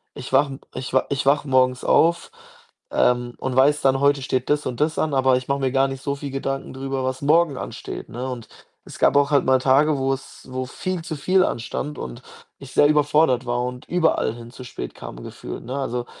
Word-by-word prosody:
Ich 130 - -8
wache 140 +1 +3
'n 135 - -9 0.2
ich 130 - -5
w 130 - +5
ich 140 -1 -1
wache 145 +1 +3
morgens 130 -1 +2
auf, 170 - +3 0.6
ähm, 120 0 +1
und 130 -1 -3
weiß 145 +3 +4
dann, 135 0 +3
heute 140 0 +3
steht 130 -1 -1
das 150 0 +1
und 125 +1 -3
das 155 +1 +1
an, 155 -2 0
aber 130 -1 +4
ich 125 - -6
mache 140 0 0
mir 130 -2 0
gar 135 0 +3
nicht 135 -1 -6
so 140 -1 -1
viel 140 0 -6
Gedanken 135 0 -3
darüber, 135 0 -3
was 130 +1 -3
morgen 155 +1 +3
ansteht, - - -7
ne, 125 +3 -5
und 120 -3 -6 0.4
es - - -10
gab - - +4
auch 140 0 +4
halt 140 -2 +3
mal 130 0 +4
Tage, 140 +3 +3
wo's 135 0 -3
wo 130 0 -3
viel 185 +7 -4
zu 165 -2 -5
viel 185 +6 +3
anstand 140 +5 -4
und 60 -1 -7 0.3
ich 135 -1 -12
sehr 145 - +5
überfordert 145 -3 +3
war 120 0 -1
und 125 0 -6
überall 160 -9 +1
hin 120 0 -10
zu 130 - -10
spät 60 - -7
kam - - -9
gefühlt, - - -8
ne? 130 +4 -5
Also, 125 -3 -2
135 Hz, 220 wpm, -22 LUFS, 130-145 Hz, 0.6 s, w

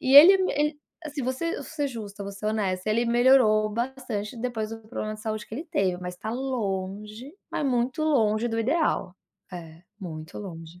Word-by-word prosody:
E 265 +1 +2
ele 370 +7 +11
me 375 - +1
ele 295 0 +1 0.3
assim, 290 -2 -4
vou 255 +1 0
ser 335 +6 -2
vou - - -5
ser 290 -3 -2
justa, 210 -5 -7
vou 200 - -5
ser 210 +2 -6
honesta, 205 -2 0
ele 235 +2 +2
melhorou 235 -3 +5
bastante 235 -2 -3
depois 225 -3 -2
do 225 - -6
problema 215 -2 -3
de 215 - -10
saúde 215 -1 -3
que 220 - -8
ele 310 +7 -4
teve, 195 - 0
mas 180 0 -6
tá 220 - -5
longe, 215 -1 -3 0.2
mas 295 - -1
muito 255 +4 0
longe 235 -6 +2
do 225 0 -2
ideal. 255 - +1 0.4
É, 165 -1 -9 0.2
muito 160 -3 -7
longe. 170 -3 -9
225 Hz, 195 wpm, -26 LUFS, 200-265 Hz, 0.4 s, ele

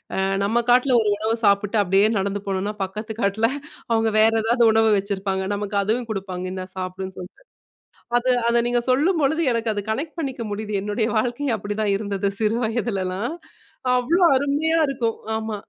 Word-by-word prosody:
அ - - -3 0.3
நம்ம 235 +4 +1
காட்ல 250 0 +4
ஒரு 215 - +1
உணவு 220 +2 0
சாப்பிட்டு 200 +2 +2
அப்பிடியே 195 +2 +3
நடந்து 200 +1 -2
போனோன்னா 195 +2 -2
பக்கத்து 215 +3 -6
காட்ல 200 +3 +2 0.4
அவுங்க 225 -1 +2
வேற 220 +1 +6
எதாவது 235 +1 +3
உணவு 225 0 +4
வச்சிருப்பாங்க. 195 -1 -2
நமக்கு 205 0 -3
அதுவும் 230 +4 -1
குடுப்பாங்க. 190 -3 -4
இந்தா 185 -1 -5
சாப்பிடுன்னு 185 0 -5
சொல்லிட்டு. 180 - -11 0.8
அது 255 +1 -2 0.2
அத 235 0 +3
நீங்க 245 0 +1
சொல்லும் 320 +6 +2
பொழுது 315 +4 +1
எனக்கு 230 -1 0
அது 205 - -3
கனெக்ட் 300 +8 -4
பண்ணிக்க 260 -5 -4
முடியுது. 210 0 -4
என்னுடைய 215 +2 -1
வாழ்க்கையும் 245 +2 -1
அப்பிடிதான் 205 0 -1
இருந்தது 200 -1 -2
சிறு 220 +1 +1
வயதுலல்லாம். 215 - -2 0.6
அவ்ளோ 335 +9 +2
அருமையா 295 +4 +1
இருக்கும். 245 -5 -1 0.2
ஆமா. 220 -1 -4
220 Hz, 160 wpm, -22 LUFS, 200-240 Hz, 0.8 s, வேற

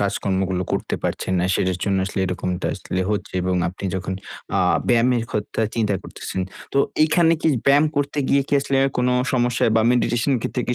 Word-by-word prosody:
কাজকর্মগুলো 95 -2 0
করতে - - -1
পারছেন 95 - -2
না। 90 - +1
সেটার 90 0 0
জন্য 100 -2 +1
আসলে, 100 - -5
এরকমটা 90 0 -2
আসলে 95 -1 -4
হচ্ছে। 105 - -3
এবং 95 0 0
আপনি 95 +2 -8
যখন 95 0 -3 0.4
আ - - +2 0.3
ব্যায়ামের 120 0 +3
কথা 105 +1 -2
চিন্তা 105 -3 +1
করতেছেন। 95 - -6 0.3
তো, 140 - +2 0.3
এখানে 165 +1 +3
কি - - +3 0.2
ব্যায়াম 145 +2 +5
করতে 145 +1 -1
গিয়ে 140 0 +3
কি - - -7
আসলে 135 0 -1
অ্যা 135 - +2
কোন 125 - +2 0.2
সমস্যায়, 120 -2 +2
বা 110 - +5
মেডিটেশন 120 +2 +1
এর - - +1
ক্ষেত্রে 125 - -2
কি 125 - +1
115 Hz, 190 wpm, -22 LUFS, 95-130 Hz, 0.4 s, ব্যায়াম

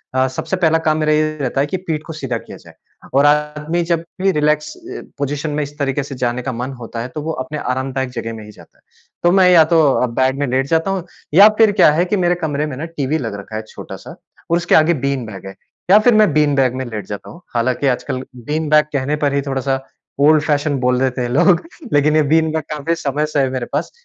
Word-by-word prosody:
अ, 130 0 +3
सबसे 130 +8 -3
पहला 165 -2 +3
काम 155 0 +2
मेरा 155 -1 +1
ये 155 0 0
रहता 135 +1 0
है 145 - 0
कि 190 - -2
पीठ 160 -4 -4
को 160 - -7
सीधा 135 -6 -3
किया - - -11
जाए। - - -17 0.4
और 140 +2 +4
आदमी 150 +3 +1
जब 170 -1 +1 0.2
भी 195 0 +3
रिलैक्स 150 -1 0
अ, - - -9 0.2
पोज़िशन 145 +2 -2
में 150 - -1
इस 145 +1 -9
तरीके 140 0 -1
से 140 -1 -8
जाने 125 0 -1
का 130 +1 -3
मन 125 +3 -4
होता 115 0 -7
है 120 - -4
तो 150 - -3
वो 160 +2 -3
अपने 150 +3 -6
आरामदायक 130 0 -2
जगह 115 -2 -5
में 110 -1 -9
ही 105 - -12
जाता - - -18
है। - - -31 0.4
तो 175 - +4
मैं 185 -1 +5
या 170 -3 +7
तो 165 - +6 0.4
बेड 130 +1 +1
में 145 - +1
लेट 130 +2 0
जाता 165 +5 +1
हूँ 190 -3 -2 0.3
या 200 +5 +9
फ़िर 220 -2 +5
क्या 190 -6 +5
है 170 +4 +1
कि 205 +3 0
मेरे 175 -1 +2
कमरे 150 -1 -1
में 145 -4 -5
ना 160 - -4
टीवी 155 -2 -2
लग 115 -7 -4
रखा 110 +2 -9
है 110 - -2
छोटा-सा - - -10 0.3
और 170 - +3
उसके 175 0 +2
आगे 160 +2 +5
बीन 135 -4 -1
बैग 95 -3 -9
है। 95 - -9 0.4
या 210 - +8
फिर 240 +2 +4
मैं 215 -6 +4
बीन 150 -2 +3
बैग 130 -2 +2
में 130 0 -3
लेट 110 -3 -6
जाता 105 -1 -7
हूँ। 170 - -13
हालाँकि 125 +4 0
आजकल 130 0 -2
बीन 150 +6 -3
बैग 150 0 +5
कहने 140 +2 0
पर 140 - +1
ही 140 - +1
थोड़ा-सा 135 0 -1 0.4
ओल्ड-फैशन 150 -1 +3
बोल 125 0 +1
देते 130 -1 0
हैं 120 - -2
लोग। 170 +7 +4 0.3
लेकिन 150 +1 +3
ये 155 - +4
बीन 160 -1 +3
बैग 160 -2 -2
काफ़ी 150 +3 -1
समय 150 0 -1
से 145 - +2
है 135 -1 +2
मेरे 125 -2 -3
पास। - - -2
145 Hz, 250 wpm, -18 LUFS, 130-160 Hz, 0.4 s, या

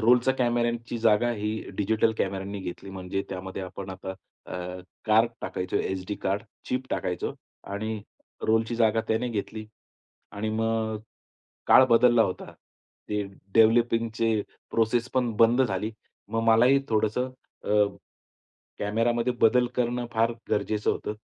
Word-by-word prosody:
रोलच्या 125 +3 +4
कॅमेऱ्यांची 120 -1 0
जागा 110 +1 +3
ही 105 -1 -2 0.2
डिजिटल 110 +2 +2
कॅमेऱ्यांनी 95 +1 -2
घेतली. 95 +1 -7
म्हणजे 95 0 -3
त्यामध्ये 95 0 -5
आपण 95 +1 -7
आता 95 0 -6 0.3
अ, - - -9 0.5
कार्ड 110 +1 +4
टाकायचो 90 0 -3
एसडी 95 +2 -2
कार्ड, 100 +2 -1 0.2
चीप 130 +1 -2
टाकायचो 90 -1 -2 0.4
आणि 110 +1 -3 0.5
रोलची 110 +1 +2
जागा 115 -1 +3
त्याने 110 +3 +1
घेतली. 110 0 -4 0.7
आणि 105 +2 -3
मग 110 0 0 0.7
काळ 130 - +8
बदलला 120 -1 +5
होता. 90 - -2 0.6
ते 105 0 0 0.3
डेव्हलपिंगचे 115 -1 +3 0.3
प्रोसेस 115 +2 +1
पण 125 -3 +1
बंद 115 +3 +5
झाली. 105 -2 -1 0.4
मग 115 +1 -1
मलाही 125 +5 +6
थोडंसं 110 +3 +1 0.3
अ, - - -6 1.1
कॅमेरामध्ये 115 +4 +1
बदल 125 +2 +5
करणं 120 0 0
फार 115 +1 +2 0.2
गरजेचं 105 0 +1
होतं. 105 - -3
110 Hz, 125 wpm, -27 LUFS, 105-120 Hz, 1.1 s, काळ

